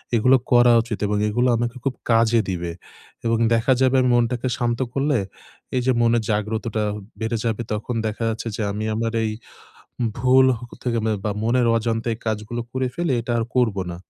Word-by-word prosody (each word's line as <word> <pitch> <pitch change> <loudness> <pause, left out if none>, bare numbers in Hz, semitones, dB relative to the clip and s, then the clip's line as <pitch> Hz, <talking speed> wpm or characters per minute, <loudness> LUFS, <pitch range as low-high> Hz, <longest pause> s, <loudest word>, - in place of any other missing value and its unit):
এগুলো 125 +4 +5 0.2
করা 120 0 +6
উচিত 115 -4 -5
এবং 105 0 0
এগুলো 120 +4 +1
আমাকে 120 +1 -2
খুব 135 - 0 0.2
কাজে 115 0 +4
দিবে 85 -2 -3 0.5
এবং 115 0 +2 0.2
দেখা 115 +3 +2
যাবে 130 0 +3
আমি 125 - +2
মনটাকে 120 +1 +1
শান্ত 120 -1 -1
করলে 140 0 +1 0.6
এইযে 125 +1 +2
মনের 115 -1 +3
জাগ্রতটা 110 +1 -1 0.4
বেড়ে 115 +1 -1
যাবে। 115 0 -1
তখন 110 +3 -3
দেখা 110 +2 -4
যাচ্ছে 115 +1 -4
যে - - -4
আমি 105 +2 -3
আমার 115 +1 -1
এই 110 - -1 0.9
ভুল 130 +2 +5
হ - - -18 0.2
থেকে 120 -2 0 0.3
বা, 105 - 0
মনের 120 +1 +2
অজান্তে 115 0 -1
এই - - -12
কাজগুলো 110 +2 -2
করে 130 0 -1
ফেলে, 170 -4 -1
এটা 120 +1 -3
আর 115 - 0
করবো 110 -6 +2
না। 85 - -6
115 Hz, 180 wpm, -22 LUFS, 110-125 Hz, 0.9 s, করা